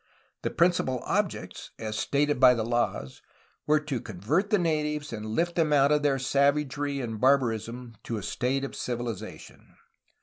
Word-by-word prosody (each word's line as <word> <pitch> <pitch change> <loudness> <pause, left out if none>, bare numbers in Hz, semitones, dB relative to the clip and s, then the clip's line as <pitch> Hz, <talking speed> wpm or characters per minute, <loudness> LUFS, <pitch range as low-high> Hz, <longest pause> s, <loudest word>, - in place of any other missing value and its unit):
The - - -1
principal 170 -7 +2
objects, - - -2
as 110 -1 -4
stated 145 +2 +1
by 125 -1 +7
the 110 -2 -2
laws, 120 - -2 0.5
were 155 +1 +4
to 140 -6 -3
convert 115 - -1
the 210 - +4
natives 150 -4 -1
and 105 -1 -5
lift 170 +11 0
them 160 -3 +2
out 140 0 +4
of 150 0 +3
their 145 -2 +2
savagery 140 +1 +1
and 110 -3 -5
barbarism 120 -2 +1
to 115 - -3
a 105 - -6
state 130 +6 -1
of 135 - -5
civilization. 120 -4 -6
135 Hz, 160 wpm, -27 LUFS, 120-150 Hz, 0.5 s, by